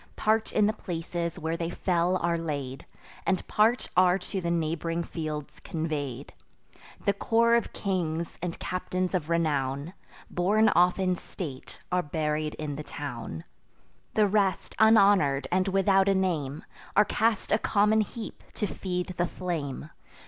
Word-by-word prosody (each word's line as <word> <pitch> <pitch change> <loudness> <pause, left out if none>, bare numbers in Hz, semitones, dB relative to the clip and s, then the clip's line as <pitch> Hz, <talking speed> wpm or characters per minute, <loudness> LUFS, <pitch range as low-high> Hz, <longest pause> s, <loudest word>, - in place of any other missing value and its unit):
Part 220 +1 +1
in 210 - +3
the 215 - +2
places 170 -3 -4
where 160 +1 -2
they 165 0 -2
fell 175 0 +1
are 170 -1 0
laid; 145 -5 -4 0.4
And 190 -1 0
part 225 +4 +3
are 180 0 +5
to 195 +1 -4
the 170 - -1
neighb'ring 165 0 -1
fields 155 -3 -5
convey'd. 150 -6 -4 0.7
The 200 - +4
corps 230 +3 +3
of 235 -1 +2
kings, 170 -4 -2
and 175 -1 -3
captains 185 0 -2
of 170 -4 -1
renown, 145 -2 0 0.4
Borne 210 +5 +3
off 180 0 +4
in 185 -2 +1
state, 145 -9 -8
are 180 0 +3
buried 150 -1 -2
in 150 -2 -4
the 150 - -5
town; 120 - -6 0.7
The 215 - +5
rest, 195 -2 +1
unhonour'd, 200 -10 +5
and 185 +2 +2
without 195 0 +3
a 195 - +3
name, 160 -7 -1 0.3
Are 210 - +7
cast 225 0 0
a 215 - +4
common 210 +1 +3
heap 215 +2 -6
to - - -1
feed 180 -2 -3
the 175 - +1
flame. 155 -6 -4
175 Hz, 150 wpm, -28 LUFS, 155-195 Hz, 0.7 s, Are